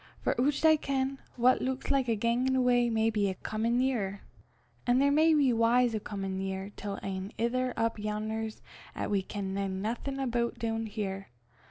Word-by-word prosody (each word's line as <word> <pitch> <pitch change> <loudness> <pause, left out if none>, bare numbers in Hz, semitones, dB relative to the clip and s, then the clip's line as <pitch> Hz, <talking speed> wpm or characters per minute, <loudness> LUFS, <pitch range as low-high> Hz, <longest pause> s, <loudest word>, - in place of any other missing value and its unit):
For - - +2
oucht 285 +4 +2
I 315 0 +6
ken, 270 -1 -1 0.2
what 250 +1 +4
luiks 260 +1 -2
like 270 -2 +2
a 230 - +2
gangin' 235 +4 +1
awa 245 -2 +3
may 225 0 +2
be 205 -2 +1
a 190 - -3
comin' 225 +5 -1
nearer. 220 -7 0 0.7
An' 245 +1 +4
there 280 +1 +4
may 315 +2 +5
be 280 -4 +4
w'ys 235 +1 +3
o' 215 - 0
comin' 195 -2 -4
nearer 190 +1 -4
till 200 -1 -5
ane 190 +1 -4
anither 250 +3 0
up 225 -1 0
yon'er 215 +1 -2 0.5
'at - - -3
we 200 -1 +2
ken 195 0 -5
naething 200 +7 -3
aboot 240 -3 -1
doon 225 -1 -2
here. 195 -2 -4
230 Hz, 180 wpm, -30 LUFS, 205-255 Hz, 0.7 s, I